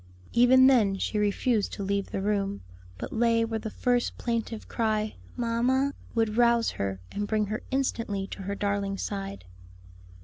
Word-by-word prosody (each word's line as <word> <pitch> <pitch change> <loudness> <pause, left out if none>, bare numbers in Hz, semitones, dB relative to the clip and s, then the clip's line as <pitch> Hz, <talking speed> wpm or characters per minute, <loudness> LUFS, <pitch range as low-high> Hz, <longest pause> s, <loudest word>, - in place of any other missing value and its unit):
Even 255 +2 +6
then 220 -7 +4
she 210 +2 -1
refused 210 +2 +1
to 200 - -4
leave 200 0 -1
the 195 - -3
room, 200 -1 -1 0.3
but - - -6
lay 230 0 +3
where 225 -1 -2
the 220 - -5
first 245 +2 0
plaintive 230 -2 -3
cry, 215 -1 0 0.2
"Mamma," 250 +4 +1 0.2
would 225 -1 +1
rouse 235 -1 +4
her 95 -1 -3
and 205 0 -3
bring 215 0 +1
her 215 +2 -3
instantly 230 -7 -1
to 195 - -8
her 200 +1 -3
darling's 200 -1 -1
side. 195 - -5
215 Hz, 160 wpm, -28 LUFS, 200-235 Hz, 0.3 s, Even